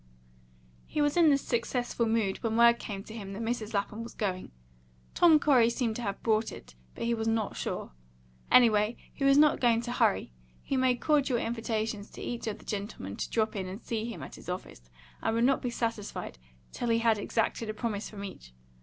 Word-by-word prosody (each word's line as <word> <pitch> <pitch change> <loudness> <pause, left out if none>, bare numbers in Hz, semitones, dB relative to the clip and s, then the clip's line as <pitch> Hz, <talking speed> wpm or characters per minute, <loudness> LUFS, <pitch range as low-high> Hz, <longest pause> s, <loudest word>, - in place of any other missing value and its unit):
He - - -3
was 290 -1 +2
in 340 -3 +6
this 280 -1 +3
successful 240 -1 -1
mood 220 -4 0
when 225 -1 -1
word 235 0 +6
came 195 -2 -6
to 215 - -11
him 200 -3 -7
that 205 - -5
Mrs. 225 -2 -3
Lapham 205 +2 -2
was 230 - -8
going; 190 -4 -2 0.6
Tom 330 -3 +6
Corey 255 -6 +5
seemed 235 -2 -1
to - - -5
have 200 -3 -4
brought 220 -1 +2
it, - - -11 0.2
but - - -5
he 235 0 +1
was 225 -1 -2
not 225 -2 0
sure. - - -4 0.6
Anyway, 220 -2 +5 0.2
he - - -5
was 275 0 +6
not 300 0 +5
going 235 -2 +3
to 240 0 -5
hurry. 95 - +1 0.3
He 275 - -2
made 255 -2 +2
cordial 285 -5 +2
invitations 225 -2 -2
to - - -9
each 235 -1 -4
of 215 -1 -2
the - - -17
gentlemen 200 - -5
to - - -3
drop 220 -1 0
in 190 -2 -3
and 190 +3 -6
see 225 -2 -3
him - - -8
at - - -9
his - - -10
office, - - -7 0.3
and 225 - 0
would 230 - +2
not 265 +2 +3
be 250 - -2
satisfied 225 - -4 0.3
till 240 - -3
he 230 - +4
had 230 -2 +2
exacted 225 +1 -1
a - - -2
promise 215 -2 -3
from 200 -2 -8
each. 60 - -9
225 Hz, 210 wpm, -29 LUFS, 210-240 Hz, 0.6 s, in